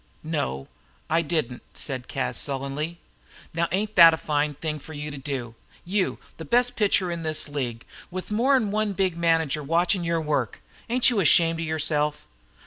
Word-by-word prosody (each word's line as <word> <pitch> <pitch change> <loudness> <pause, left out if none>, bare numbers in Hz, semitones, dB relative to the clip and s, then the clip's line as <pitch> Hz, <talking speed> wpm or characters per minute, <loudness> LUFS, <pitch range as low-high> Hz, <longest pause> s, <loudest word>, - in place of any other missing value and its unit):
"No, 145 - -3 0.4
I 165 +1 +4
didn't," 150 -7 -2
said 130 -3 -4
Cas, 135 - -2
sullenly. 140 +4 -3 0.6
"Now, 170 +1 +1
ain't 210 +4 -1
that 165 -2 +9
a - - -10
fine 150 -1 -1
thing 155 +1 -4
for 160 - -11
you 150 0 -5
to 140 - -7
do? 130 -4 -4 0.3
You, 190 +1 0 0.2
the 160 - -7
best 245 +8 +2
pitcher 195 -4 +2
in 170 -1 -4
this 155 -1 0
league, 125 -6 -4 0.2
with 185 +3 -6
more 250 +6 +3
'n 220 -6 +1
one 215 -1 0
big 190 -3 0
manager 165 -3 +1
watchin' 170 +5 +1
your 170 0 0
work! 145 -8 -1 0.3
Ain't 250 +1 +5
you 225 - +1
ashamed 165 -2 +4
of 165 - -3
yourself?" 150 -1 0
160 Hz, 175 wpm, -25 LUFS, 145-180 Hz, 0.6 s, that